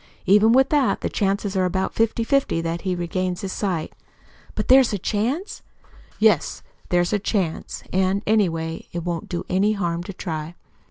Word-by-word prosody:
Even 210 +3 +5
with 265 +2 +4
that, 290 -4 +2
the - - -1
chances 200 0 -1
are 190 - +2
about 190 +1 -1
fifty 225 +1 +1
fifty 275 -7 +1
that 165 +1 -3
he 185 -2 -1
regains 180 +1 -2
his 190 -1 -4
sight." 180 -6 -2 0.6
"But - - -2
there's 260 -3 +6
a - - 0
chance?" 235 - -2 0.6
"Yes, - - +2 0.3
there's 175 +2 +2
a 205 - +2
chance. 190 -5 -2
And, 190 +2 +1
anyway, 165 -7 0
it 170 -1 -4
won't 170 -2 -3
do 175 - -3
any 200 +3 +2
harm 170 -4 -2
to 195 - -6
try. 160 -2 -5
190 Hz, 170 wpm, -23 LUFS, 175-215 Hz, 0.6 s, there's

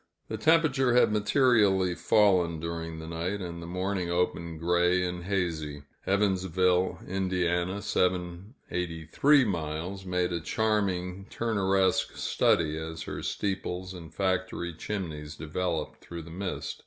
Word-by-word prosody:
The - - -3
temperature 150 -6 +3
had 125 - +5
materially 105 -4 +3
fallen 90 -5 +3
during 85 0 -4
the 80 - -7
night, 85 +5 -2
and 85 -2 -6
the 85 - -7
morning 90 0 -2
opened 85 -2 -1
gray 90 +2 +3
and 90 -1 -4
hazy. 80 -7 -2 0.2
Evansville, 95 -2 +2
Ind. 95 0 -1 0.5
(783 90 - +1
miles), 85 +1 -3
made 90 -1 0
a 85 - -1
charming 95 -1 -1
Turneresque 95 -4 +1
study, 80 0 +2
as 80 0 -5
her - - -5
steeples 95 -2 -3
and 85 -3 -10
factory 95 -1 -1
chimneys 80 -5 -5
developed 80 +1 -3
through 85 -1 -7
the 80 - -11
mist. 95 +2 -4
90 Hz, 120 wpm, -28 LUFS, 85-100 Hz, 0.5 s, had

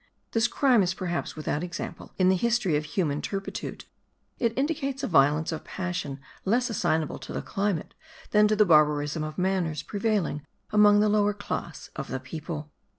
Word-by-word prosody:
This 225 +1 +3
crime 250 -2 +4
is 185 0 0
perhaps 175 -2 -3
without 155 0 -2
example 175 -1 -6
in 185 -1 +4
the 190 - +4
history 230 -4 +1
of 150 +1 0
human 150 -3 -1
turpitude: 195 -1 -5 0.5
it 230 -2 +2
indicates 275 -1 -1
a - - +1
violence 150 0 +3
of 160 - -4
passion 175 -7 -4 0.2
less 240 +5 +1
assignable 160 -7 0
to - - -9
the - - -3
climate 195 -5 -2 0.4
than 210 0 +6
to 215 - +2
the 210 0 +5
barbarism 150 -2 +3
of 155 0 -6
manners 180 -5 0
prevailing 200 -8 -1 0.3
among 205 -1 +6
the 215 - +4
lower 205 -1 +2
class 175 -5 -5
of - - -4
the 130 - -3
people. 150 +2 -6
185 Hz, 170 wpm, -27 LUFS, 155-210 Hz, 0.5 s, than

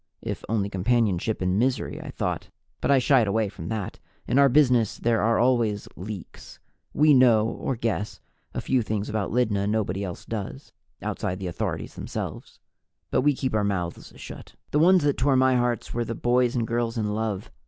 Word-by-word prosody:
(If - - -4
only 105 -3 +1
companionship 105 0 0
in 90 +2 +1
misery, 130 +2 -1
I - - -8
thought - - -3 0.3
but - - -1
I 140 - +6
shied 125 -3 +4
away 110 +1 +1
from 80 -4 -8
that. 105 -2 -4 0.3
In 130 - +3
our 140 -1 +6
business, 125 -5 +3
there 115 -1 +1
are 115 +2 +2
always 120 -5 +1
leaks; 95 0 -9 0.3
we 150 0 +5
know 120 -5 +5
or 130 - -3
guess 110 -2 -2 0.3
a - - -4
few 130 -2 +1
things 105 -2 -3
about 110 -2 -1
Lydna 105 -5 +1
nobody 100 -3 -1
else 90 -3 -6
does, 105 -4 -6 0.3
outside 90 - -2
the 95 - -6
authorities 85 - -3
themselves. - - -6 0.5
But - - +3
we 145 +1 +3
keep 130 -1 -2
our 105 -1 +2
mouths 90 -4 -3
shut.) - - -10 0.2
The 150 - +2
ones 180 +1 +5
that 145 -1 +1
tore 135 +1 +3
my 130 0 +4
hearts 120 -2 -1
were 120 - 0
the 115 0 -4
boys 125 +1 +2
and 115 -2 +1
girls 115 0 -1
in 105 -2 -1
love. 110 0 -3
115 Hz, 185 wpm, -25 LUFS, 105-125 Hz, 0.5 s, I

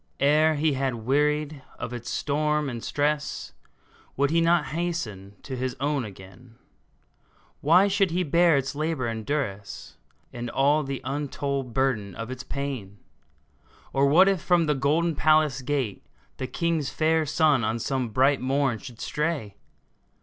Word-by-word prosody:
Ere 155 +3 +4
he 150 0 +1
had 135 -2 -1
wearied 150 +2 +1 0.2
of 120 - -5
its 120 -1 -6
storm 150 0 0
and 115 -2 -6
stress, 145 0 -2 0.6
Would 140 +1 +2
he 165 +1 +3
not 165 -1 +2
hasten 120 - -4
to 135 - -5
his 130 0 -3
own 140 -2 0
again? 100 +4 -13 1.0
Why 180 +7 +5
should 195 -1 +2
he 180 +2 0
bear 170 0 +4
its 135 +1 -2
labor 155 -2 -2
and 115 -1 -3
duress, 105 -8 -4 0.4
And 120 0 -5
all 145 +4 +3
the 135 -2 -4
untold 140 -2 -3
burden 110 -8 0
of 115 +2 -6
its 130 0 -6
pain? 130 -10 -5 1.0
Or 135 +1 +3
what 175 +7 +6
if 195 -4 +2
from 175 -2 +3
the 150 - +2
golden 155 +5 +1
palace 155 -3 +3
gate 130 -6 -2 0.3
The 130 - -3
king's 165 -3 -1
fair 160 +2 +1
son 150 -4 +3
on 110 +2 0
some 130 +1 -2
bright 135 +5 +3
morn 130 -3 0
should 125 -4 -11
stray 150 -10 -2
140 Hz, 150 wpm, -26 LUFS, 125-155 Hz, 1.0 s, what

